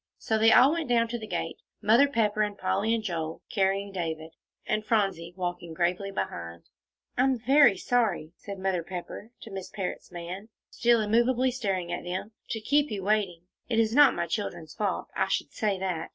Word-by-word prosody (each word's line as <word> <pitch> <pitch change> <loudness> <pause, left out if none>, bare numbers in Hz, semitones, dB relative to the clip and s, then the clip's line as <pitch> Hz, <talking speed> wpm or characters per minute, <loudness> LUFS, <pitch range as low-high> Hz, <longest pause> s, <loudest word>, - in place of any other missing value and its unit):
So 220 -1 0
they 225 +1 +6
all 260 +3 +7
went 325 -4 -2
down 230 -1 +3
to 240 0 -3
the 215 - -7
gate, - - -3 0.2
Mother 230 +7 +5
Pepper 215 -5 +1
and 205 -1 -1
Polly 200 +3 0
and 225 - -3
Joel 165 -5 -4
carrying 195 +1 +1
David, 160 -3 -4 0.3
and 215 - 0
Phronsie 195 -6 0
walking 175 -2 -4
gravely 180 +4 0
behind. 85 - -5 0.6
"I - - +6
am 265 -1 +2
very 265 -3 +5
sorry," 215 -9 0
said 200 -1 -8
Mother 190 -2 0
Pepper 180 +5 -7
to 220 - -10
Miss 190 -1 -6
Parrott's 190 -2 -5
man, 180 +5 -7 0.2
still 235 -1 +3
immovably 240 +4 +2
staring 195 -8 -2
at 175 - -3
them, 185 +4 -4 0.2
"to 220 - -2
keep 290 +7 +2
you 205 -4 -4
waiting. 195 -4 0 0.3
It 230 - 0
is 225 -1 +3
not 290 0 +7
my 170 - -1
children's 170 -3 -4
fault, 205 -4 -2
I 190 - +1
should 195 - -1
say 205 -3 0
that." 180 -4 -3
200 Hz, 190 wpm, -28 LUFS, 180-225 Hz, 0.6 s, all